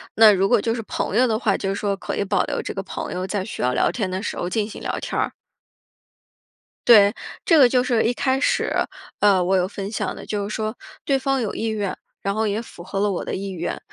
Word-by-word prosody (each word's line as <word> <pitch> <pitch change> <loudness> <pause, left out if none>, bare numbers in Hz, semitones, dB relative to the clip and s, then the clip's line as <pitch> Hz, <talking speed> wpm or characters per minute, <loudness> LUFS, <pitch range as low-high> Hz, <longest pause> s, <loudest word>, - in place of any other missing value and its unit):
那 220 -1 +8
如 195 -1 +2
果 235 -2 +3
就 225 +1 0
是 235 - -3
朋 210 - -3
友 250 +3 +5
的 220 -2 +1
话， 210 -5 +1
就 195 - -2
是 195 - -1
说 200 -1 -1
可 195 - -5
以 - - 0
保 195 -1 +1
留 - - -2
这 - - -5
个 195 - -4
朋 - - -5
友 185 +1 -3
在 190 0 -2
需 215 - -6
要 125 0 +1
聊 - - +2
天 205 -6 -2
的 185 +1 -3
时 - - -4
候 175 - -2
进 210 +1 0
行 - - -9
聊 - - -2
天 - - -3
儿。 - - 0 1.6
对， 205 -3 +8 0.3
这 330 - +5
个 265 - +8
就 250 0 +3
是 240 -3 +2
一 240 - +2
开 260 +1 +1
始， - - +1 0.5
呃， 195 -3 +4
我 190 +2 +2
有 180 0 +1
分 195 0 -6
享 - - -2
的， - - -9
就 205 -1 -2
是 215 - -4
说 215 +1 -2 0.3
对 275 -1 +2
方 270 -1 0
有 215 - -2
意 225 - -2
愿， 210 -3 -2 0.3
然 200 - -1
后 220 +1 0
也 210 +3 -1
符 175 - -12
合 195 +2 -4
了 205 0 +2
我 180 - -3
的 - - -3
意 195 +1 -4
愿， 175 -2 -4
205 Hz, 280 characters per minute, -22 LUFS, 195-225 Hz, 1.6 s, 那